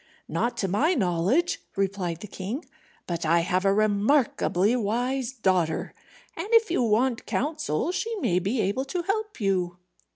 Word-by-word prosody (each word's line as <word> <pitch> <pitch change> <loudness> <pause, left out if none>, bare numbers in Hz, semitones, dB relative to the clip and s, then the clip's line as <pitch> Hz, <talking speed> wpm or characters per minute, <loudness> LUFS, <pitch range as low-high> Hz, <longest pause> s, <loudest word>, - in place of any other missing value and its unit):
"Not 240 - -1
to 195 - 0
my 285 - +2
knowledge," 200 - +1
replied 190 -4 -2
the 210 - -7
king. 205 - -5 0.4
"But 170 -1 -3
I 170 +1 +3
have 185 +2 0
a 195 - +5
remarkably 215 0 +2
wise 245 +3 -1
daughter, 185 -9 0 0.4
and 335 +4 -4
if 455 -5 +5
you 350 - +2
want 235 +2 +1
counsel 305 - -1
she 455 +5 -2
may 180 - +1
be 215 +6 0
able 205 +8 0
to 345 +5 -3
help 420 +1 -2
you." 185 -4 0
215 Hz, 155 wpm, -26 LUFS, 185-275 Hz, 0.4 s, a